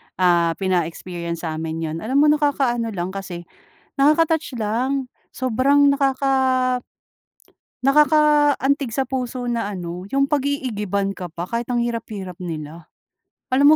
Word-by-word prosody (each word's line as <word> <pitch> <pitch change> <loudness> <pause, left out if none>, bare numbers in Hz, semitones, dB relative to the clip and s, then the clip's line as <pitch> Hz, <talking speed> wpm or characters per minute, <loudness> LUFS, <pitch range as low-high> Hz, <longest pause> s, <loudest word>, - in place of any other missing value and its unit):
ah, 170 -2 +3
pina-experience 170 -2 -3
sa 160 -1 -3
amin 160 0 -4
'yon. 160 0 -3
Alam 265 - +2
mo - - +5
nakakaano 275 -6 +1
lang 180 0 -3
kasi 185 -3 -6 0.5
nakaka-touch 305 -2 +2
lang. 250 +5 -1 0.2
Sobrang 265 +3 +3
nakaka 265 -2 +1 1.0
nakaka-antig 290 -2 +3
sa 265 +3 0
puso 250 -1 -3
na 230 -4 -1
ano 180 -1 -6
yung 275 0 +2
pag-iigiban 215 -9 -1
ka 180 -3 -7
pa 175 +2 -5
kahit 235 +1 -2
ang 240 -1 +1
hirap-hirap 215 -6 -4
nila. 160 -1 -7 0.7
Alam 285 +3 +7
240 Hz, 120 wpm, -21 LUFS, 180-275 Hz, 1.0 s, Alam